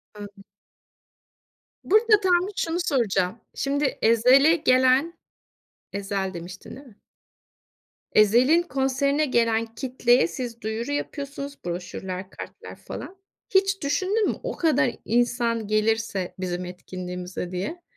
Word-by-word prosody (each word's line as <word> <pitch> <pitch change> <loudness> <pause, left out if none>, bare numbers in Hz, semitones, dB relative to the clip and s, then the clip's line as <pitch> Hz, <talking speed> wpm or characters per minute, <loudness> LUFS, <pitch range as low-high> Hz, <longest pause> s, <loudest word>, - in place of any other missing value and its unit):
Anladım. 205 -1 -10 1.4
Burada 430 +1 +4
tam 365 -2 +2
bir 415 - -8
şunu 330 +1 -1
soracağım. 225 - 0 0.2
Şimdi 280 0 -1
Ezel'e 255 +8 +5
gelen 260 +1 +3 0.8
Ezel 195 -1 -3
demiştin, 175 +2 -9
değil 270 +1 -13
mi? 210 - -19 1.1
Ezel'in 245 +10 +5
konserine 280 -1 0
gelen 230 -4 +1
kitleye 245 - +2
siz 235 +6 -6
duyuru 220 +5 -3
yapıyorsunuz, 285 -1 -5
broşürler, 180 +2 -5
kartlar - - -10
falan. 385 - -9 0.3
Hiç 390 0 +2
düşündün 380 +9 +1
mü, - - -1
o - - -4
kadar 310 -6 +2
insan 235 -1 0
gelirse 215 -3 0
bizim 180 -1 -3
etkinliğimize 180 0 -6
diye? 200 - -4
240 Hz, 110 wpm, -25 LUFS, 200-290 Hz, 1.4 s, Ezel'e